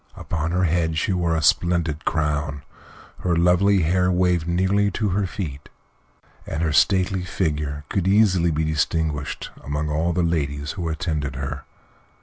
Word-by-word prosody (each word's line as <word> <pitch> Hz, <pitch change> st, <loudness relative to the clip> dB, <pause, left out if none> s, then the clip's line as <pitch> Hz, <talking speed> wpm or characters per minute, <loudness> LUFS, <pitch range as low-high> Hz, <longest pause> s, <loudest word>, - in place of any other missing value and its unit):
Upon 80 Hz, -1 st, -3 dB
her 90 Hz, +2 st, +1 dB
head 80 Hz, -1 st, +1 dB
she 95 Hz, -, 0 dB
wore 85 Hz, -2 st, +1 dB
a 80 Hz, -, -1 dB
splendid 85 Hz, -1 st, +1 dB
crown, 75 Hz, -2 st, -1 dB, 0.6 s
her 90 Hz, -2 st, 0 dB
lovely 90 Hz, +3 st, +3 dB
hair 90 Hz, +3 st, +2 dB
waved 90 Hz, -2 st, +1 dB
nearly 95 Hz, +4 st, +2 dB
to 105 Hz, +2 st, -1 dB
her 95 Hz, +1 st, 0 dB
feet, 75 Hz, -7 st, -6 dB, 0.8 s
and 80 Hz, -, -2 dB
her 80 Hz, -3 st, 0 dB
stately 95 Hz, +2 st, +2 dB
figure 75 Hz, -5 st, -2 dB
could 95 Hz, +2 st, -1 dB
easily 95 Hz, -4 st, +4 dB
be 80 Hz, 0 st, 0 dB
distinguished 80 Hz, -1 st, -1 dB
among 75 Hz, +2 st, -2 dB
all 80 Hz, +3 st, 0 dB
the 90 Hz, 0 st, 0 dB
ladies 70 Hz, -3 st, -1 dB
who 85 Hz, -4 st, -4 dB
attended 80 Hz, -4 st, -2 dB
her. 70 Hz, +1 st, -5 dB
85 Hz, 150 wpm, -23 LUFS, 75-90 Hz, 0.8 s, easily